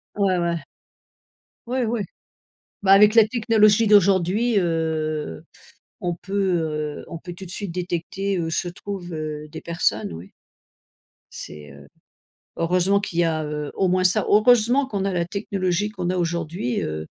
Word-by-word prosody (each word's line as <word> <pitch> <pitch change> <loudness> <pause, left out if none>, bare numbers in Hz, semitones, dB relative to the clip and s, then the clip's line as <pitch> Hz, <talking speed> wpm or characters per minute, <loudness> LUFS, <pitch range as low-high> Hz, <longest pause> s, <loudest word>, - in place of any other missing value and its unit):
Ouais, 195 -3 +2
ouais. 170 -1 -1 1.1
Oui, 255 +2 -1
oui. 230 0 -1 0.8
Bah 195 -1 +5
avec 210 +2 +7
la 225 -2 +7
technologie 220 -2 +3
d'aujourd'hui, 200 +2 +3
heu, 160 - -2 0.6
on 175 -1 -2
peut, 185 +3 -10 0.7
heu, - - -13
on - - -7
peut 175 +2 -9
tout 190 +2 -10
de - - -11
suite 195 -2 -5
détecter 180 +2 -2
où 165 -1 -2
se 175 +2 -1
trouvent, 180 -1 -7
heu, 155 -1 -5
des 160 - -8
personnes, 110 - -1
oui. 85 +3 -10 1.0
C'est, 75 -1 -9
heu 70 0 -14 0.7
heureusement 180 +4 +2
qu'il 180 -4 -3
y - - +5
a, 160 -1 0
heu, 150 -1 -4
au 190 - +1
moins 185 +1 +2
ça, 185 +2 +4
heureusement 245 +5 +4
qu'on 200 -6 -2
a 195 - -1
la 175 -1 0
technologie 195 0 -2
qu'on 185 -5 -4
a 185 - 0
aujourd'hui, 170 -6 -2
heu, 80 0 -4
180 Hz, 155 wpm, -23 LUFS, 165-200 Hz, 1.1 s, avec